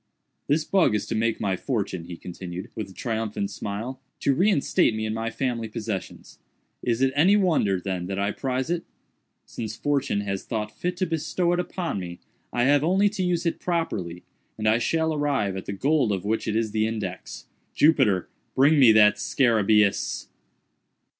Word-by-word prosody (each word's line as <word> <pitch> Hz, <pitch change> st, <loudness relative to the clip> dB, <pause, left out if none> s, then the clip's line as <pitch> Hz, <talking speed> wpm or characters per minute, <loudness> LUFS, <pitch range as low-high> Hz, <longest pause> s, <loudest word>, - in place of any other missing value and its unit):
"This 150 Hz, +2 st, +1 dB
bug 170 Hz, -, +3 dB
is 105 Hz, -1 st, -1 dB
to -, -, -4 dB
make 115 Hz, 0 st, 0 dB
my 95 Hz, -2 st, 0 dB
fortune," 100 Hz, -7 st, -3 dB
he 85 Hz, -1 st, -8 dB
continued, 90 Hz, +1 st, -7 dB
with 110 Hz, -, -5 dB
a -, -, -13 dB
triumphant 110 Hz, -1 st, -3 dB
smile, 115 Hz, +6 st, -5 dB, 0.2 s
"to 140 Hz, -, +3 dB
reinstate 170 Hz, -, +2 dB
me 110 Hz, 0 st, -2 dB
in 110 Hz, -, -2 dB
my 115 Hz, +1 st, -2 dB
family 115 Hz, -2 st, -2 dB
possessions. 110 Hz, -3 st, -6 dB, 0.4 s
Is 120 Hz, +1 st, 0 dB
it 135 Hz, 0 st, +2 dB
any 180 Hz, +8 st, +5 dB
wonder, 155 Hz, -, +2 dB
then, 90 Hz, -1 st, -3 dB
that 95 Hz, 0 st, -3 dB
I 100 Hz, +1 st, 0 dB
prize 130 Hz, +5 st, -2 dB
it? 175 Hz, -1 st, -1 dB, 0.6 s
Since 110 Hz, -2 st, -6 dB
Fortune 140 Hz, -8 st, 0 dB
has 100 Hz, -1 st, -3 dB
thought 105 Hz, -2 st, -4 dB
fit 180 Hz, 0 st, -3 dB
to 185 Hz, -, +1 dB
bestow 165 Hz, +2 st, 0 dB
it 175 Hz, -, 0 dB
upon 180 Hz, -, -3 dB
me, 85 Hz, -1 st, -7 dB, 0.3 s
I 120 Hz, -, +1 dB
have 145 Hz, +2 st, +4 dB
only 190 Hz, +5 st, +3 dB
to 205 Hz, -1 st, -4 dB
use 180 Hz, -1 st, 0 dB
it 170 Hz, -, -1 dB
properly 100 Hz, -, -2 dB, 0.3 s
and 110 Hz, 0 st, -1 dB
I 110 Hz, +2 st, +4 dB
shall 160 Hz, +5 st, +1 dB
arrive 140 Hz, -10 st, 0 dB
at 95 Hz, -, -6 dB
the -, -, -2 dB
gold 140 Hz, +2 st, +1 dB
of 95 Hz, -1 st, -2 dB
which 110 Hz, +2 st, -1 dB
it 110 Hz, -, -1 dB
is 110 Hz, -1 st, 0 dB
the 110 Hz, 0 st, +1 dB
index. 110 Hz, -2 st, -5 dB, 0.3 s
Jupiter; 105 Hz, -, +3 dB, 0.3 s
bring 145 Hz, +3 st, +5 dB
me 125 Hz, -5 st, +8 dB
that 105 Hz, -1 st, +6 dB
_scarabæus! 110 Hz, -5 st, +2 dB
115 Hz, 180 wpm, -25 LUFS, 100-150 Hz, 0.6 s, me